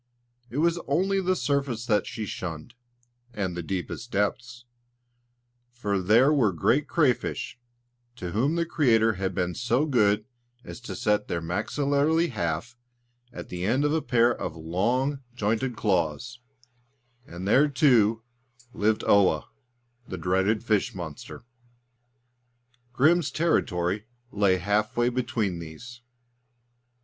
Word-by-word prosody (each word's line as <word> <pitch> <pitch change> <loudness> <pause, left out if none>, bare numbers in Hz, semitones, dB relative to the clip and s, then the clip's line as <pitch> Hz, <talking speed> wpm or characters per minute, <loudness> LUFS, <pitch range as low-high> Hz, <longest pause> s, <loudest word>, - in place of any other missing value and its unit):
It 120 - -6
was 170 +2 +2
only 190 +7 +1
the 185 0 +1
surface 140 -8 -1
that 105 -3 +1
she 115 -2 -5
shunned, 90 +2 -6 0.6
and 95 -4 -2
the 85 - -3
deepest 95 +6 -5
depths; 120 +4 -2 1.1
for 105 -5 -2
there 115 +10 +4
were 120 -9 +3
great 120 - +1
crayfish 130 -4 0 0.6
to 90 -7 -6
whom 135 - +1
the 170 0 0
Creator 115 -9 +3
had 95 -1 -2
been 90 -1 -1
so 120 - +1
good 105 -7 +2 0.4
as - - -9
to 120 - -7
set 105 -3 0
their 85 - -2
maxillary 145 - 0
half 100 - -3 0.6
at - - -9
the 90 0 -5
end 125 +9 +1
of 150 - +1
a 160 - +1
pair 120 -3 +3
of 80 - -5
long, 120 - -1
jointed 115 +3 -1
claws 100 +5 -1 0.9
and 90 +3 -7
there, 135 +8 +5
too, 120 -6 +3 0.5
lived 110 +1 +1
Oa, 100 -2 +3 0.6
the 95 - -5
dreaded 95 +6 +1
fish 110 -4 0
monster. 80 -5 -8 1.5
Grim's 155 +5 +3
territory 105 - 0 0.2
lay 100 -2 +2
half 105 +5 -1
way 120 0 +3
between 115 -7 -2
these. 100 +10 -10
115 Hz, 125 wpm, -26 LUFS, 95-135 Hz, 1.5 s, there